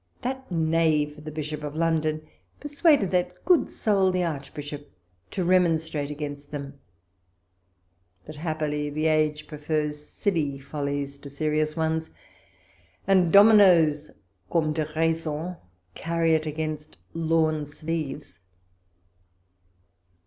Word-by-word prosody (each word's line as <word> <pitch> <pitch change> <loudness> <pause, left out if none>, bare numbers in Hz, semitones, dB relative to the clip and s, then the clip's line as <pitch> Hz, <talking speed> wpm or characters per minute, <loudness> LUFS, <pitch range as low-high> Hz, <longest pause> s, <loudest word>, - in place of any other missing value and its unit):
That 260 -2 -4
knave 160 -2 +1
the 155 - -5
Bishop 150 0 -5
of 150 0 -5
London 155 -1 0 0.3
persuaded 290 - +2
that 180 0 -1
good 360 -3 +4
soul 200 -4 +2
the 180 0 0
Archbishop 145 -2 -5 0.4
to 185 - -2
remonstrate 160 -5 +2
against 145 -1 -6
them; 140 -1 -7 1.5
but 155 0 -10
happily 150 -2 -2
the 155 +2 -2
age 155 -1 +1
prefers 150 -1 -3
silly 155 -6 -1
follies 140 0 -4
to 140 - -10
serious 155 +2 -1
ones, 160 0 -1 1.0
and 185 -4 +4
dominos, 180 -8 +6 0.4
comme 155 -2 +1
dc 155 -1 -2
raizon, 165 +1 -1 0.4
carry 165 - 0
it 155 0 +1
against 155 0 -4 0.2
lawn 160 -2 +1
sleeves. 145 - -5
155 Hz, 105 wpm, -26 LUFS, 150-165 Hz, 1.5 s, dominos